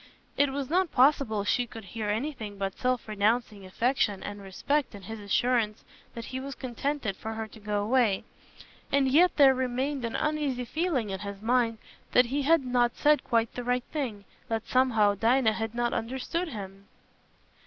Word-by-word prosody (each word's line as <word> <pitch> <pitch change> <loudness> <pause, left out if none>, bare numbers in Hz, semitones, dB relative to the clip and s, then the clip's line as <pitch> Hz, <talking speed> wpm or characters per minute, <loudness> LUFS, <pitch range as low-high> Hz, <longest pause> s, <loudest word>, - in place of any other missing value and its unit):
It 285 0 +3
was 275 -1 -3
not 360 +2 +1
possible 255 -6 +3
she 240 +3 0
should 225 - -8
hear 215 +2 -4
anything 220 -2 -3
but 195 -1 -3
self 255 -2 -1
renouncing 215 -1 0
affection 225 0 0
and 205 0 -6
respect 250 +7 -1
in 200 - -11
his 220 +3 -7
assurance 215 +1 0 0.3
that 230 -1 -6
he 260 - -2
was 275 +1 -6
contented 260 -3 -3
for 220 +3 -6
her 220 0 -4
to 220 - -14
go 205 -1 -1
away; 220 -3 +2 0.7
and 275 -1 +3
yet 330 +7 +4
there 275 -3 +7
remained 260 +2 -2
an 230 - -3
uneasy 295 -5 -1
feeling 270 - -1
in 190 - -4
his 200 -1 -6
mind 230 0 +1 0.4
that 250 - +6
he 275 +4 -1
had 300 0 +3
not 245 -1 +2
said 300 0 +3
quite 230 -2 +1
the 245 - -5
right 245 0 0
thing—that, 225 -4 -5
somehow, 225 -6 +3
Dinah 225 +2 +3
had 225 +1 -4
not 240 0 0
understood 265 +9 -2
him. 200 -6 -8
240 Hz, 175 wpm, -28 LUFS, 210-270 Hz, 0.7 s, there